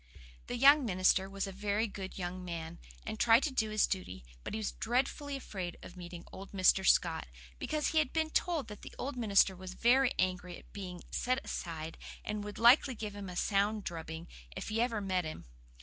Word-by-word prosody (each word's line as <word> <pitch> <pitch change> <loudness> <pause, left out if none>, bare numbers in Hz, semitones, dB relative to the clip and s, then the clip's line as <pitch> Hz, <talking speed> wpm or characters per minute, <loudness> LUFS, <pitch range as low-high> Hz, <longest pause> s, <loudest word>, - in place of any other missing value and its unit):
The 245 - -3
young 280 +3 +7
minister 190 -2 +2
was 195 +1 -2
a 195 - -6
very 205 +3 0
good 195 -3 -7
young 180 0 -4
man, 165 -2 -6 0.3
and 220 - -5
tried 235 +2 +6
to 290 - -1
do 220 -4 +1
his 215 0 +3
duty; 95 - -4 0.2
but - - -4
he - - -1
was 215 -2 -2
dreadfully 270 +4 -1
afraid 190 -9 -5
of 175 - -10
meeting 175 -1 -9
old 195 +1 -10
Mr. 190 0 +4
Scott, 170 -3 +3 0.3
because 305 -1 0
he 315 - +3
had 300 -4 +1
been 315 -1 0
told 320 -9 0
that 210 - -9
the - - -10
old 280 +2 -3
minister 200 -5 +4
was 185 0 -8
very 250 +2 +4
angry 180 -1 -1
at - - -18
being 180 -3 -7
set 255 +1 +1
aside, 160 -2 -5 0.3
and 210 -1 -3
would 205 -1 -7
likely 245 +2 +6
give 210 -2 -5
him 200 -2 -6
a 180 - -7
sound 205 +3 +1
drubbing, 160 -1 -6 0.3
if - - -5
he 220 +1 0
ever 235 -3 0
met 185 -2 0
him. 155 - -7
200 Hz, 205 wpm, -33 LUFS, 180-240 Hz, 0.3 s, young